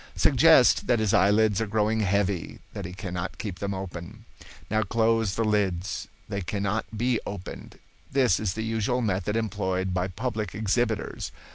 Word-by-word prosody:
Suggest -, -, +5 dB
that 120 Hz, -, +4 dB
his 110 Hz, -3 st, +1 dB
eyelids 105 Hz, +2 st, +4 dB
are 110 Hz, -, -1 dB
growing 110 Hz, +1 st, +1 dB
heavy, 100 Hz, -3 st, 0 dB, 0.2 s
that -, -, -5 dB
he 90 Hz, -, -6 dB
cannot 90 Hz, -1 st, -5 dB
keep 95 Hz, -5 st, -5 dB
them 100 Hz, 0 st, -2 dB
open. 95 Hz, +3 st, -7 dB, 0.5 s
Now 110 Hz, 0 st, +2 dB
close 115 Hz, -1 st, +1 dB
the 115 Hz, -, +1 dB
lids. 100 Hz, -4 st, 0 dB, 0.2 s
They 100 Hz, -2 st, -3 dB
cannot 100 Hz, +4 st, -2 dB
be 120 Hz, 0 st, +1 dB
opened. 100 Hz, -2 st, -8 dB, 0.3 s
This 130 Hz, -9 st, +3 dB
is 100 Hz, -4 st, -1 dB
the 110 Hz, -, -3 dB
usual 115 Hz, +2 st, 0 dB
method 100 Hz, 0 st, -1 dB
employed 95 Hz, -4 st, -1 dB
by 90 Hz, 0 st, 0 dB
public 110 Hz, -1 st, -4 dB
exhibitors. 110 Hz, +1 st, -1 dB
105 Hz, 155 wpm, -26 LUFS, 95-110 Hz, 0.5 s, Suggest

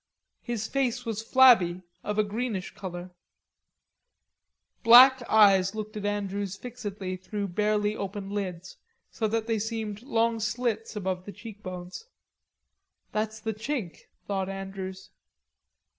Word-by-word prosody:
His 235 Hz, -3 st, -3 dB
face 255 Hz, -2 st, -1 dB
was 220 Hz, -2 st, -3 dB
flabby, 225 Hz, -8 st, +5 dB, 0.2 s
of 210 Hz, 0 st, -3 dB
a 215 Hz, -, +4 dB
greenish 210 Hz, -2 st, -3 dB
color; 180 Hz, -1 st, -7 dB, 1.7 s
black 255 Hz, +3 st, +9 dB
eyes 195 Hz, -2 st, +5 dB
looked 215 Hz, 0 st, -5 dB
at 205 Hz, -1 st, -3 dB
Andrews 200 Hz, -1 st, -2 dB
fixedly 205 Hz, -6 st, -6 dB
through 200 Hz, +2 st, -4 dB
barely 210 Hz, +2 st, +1 dB
open 200 Hz, 0 st, -5 dB
lids, 185 Hz, -3 st, -5 dB, 0.3 s
so 220 Hz, -, -1 dB
that 220 Hz, +1 st, -1 dB
they 225 Hz, -1 st, 0 dB
seemed 220 Hz, -1 st, -4 dB
long 230 Hz, -3 st, +1 dB
slits 225 Hz, 0 st, -2 dB
above 185 Hz, -2 st, -3 dB
the 205 Hz, -, -7 dB
cheekbones. 200 Hz, -, -8 dB, 1.1 s
"That's 220 Hz, 0 st, -2 dB
the 220 Hz, +1 st, -3 dB
Chink," 220 Hz, -, -5 dB, 0.2 s
thought 195 Hz, -1 st, -2 dB
Andrews. 195 Hz, -1 st, -7 dB
210 Hz, 120 wpm, -27 LUFS, 195-225 Hz, 1.7 s, black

